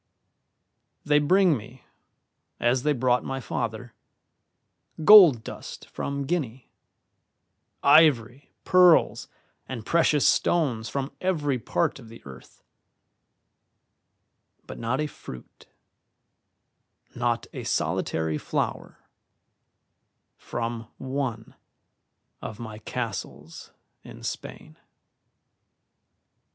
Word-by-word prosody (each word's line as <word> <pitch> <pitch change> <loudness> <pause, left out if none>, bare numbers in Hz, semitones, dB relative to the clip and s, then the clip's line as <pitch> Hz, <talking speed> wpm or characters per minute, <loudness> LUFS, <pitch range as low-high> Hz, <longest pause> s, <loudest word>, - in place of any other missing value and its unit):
"They 150 0 +4
bring 180 +3 +3
me, 120 +2 -11 0.7
as 120 +2 +1
they 150 - +1
brought 125 -2 +1
my 135 0 -4
father, 115 -1 -5 1.1
gold 180 - +9
dust - - -9
from 140 0 -4
Guinea, 135 -7 -4 1.1
ivory, 140 -4 +4
pearls, 180 -2 +4 0.4
and 115 -4 -7
precious 160 -4 +3
stones 125 -10 +1
from 135 +3 -3
every 150 -8 0
part 95 +2 -1
of 115 -4 -14
the 115 - -12
earth; 65 -3 -14 2.0
but - - -9
not 120 +3 -2
a 150 - 0
fruit, 65 - -12 1.5
not 120 -1 -1
a - - -6
solitary 80 -1 -1
flower, - - -4 1.3
from 115 -1 -5
one 130 -4 -4 0.9
of 110 0 -8
my 110 -2 -8
castles 95 - -6 0.3
in - - -12
Spain. - - -7
125 Hz, 85 wpm, -25 LUFS, 115-145 Hz, 2.0 s, gold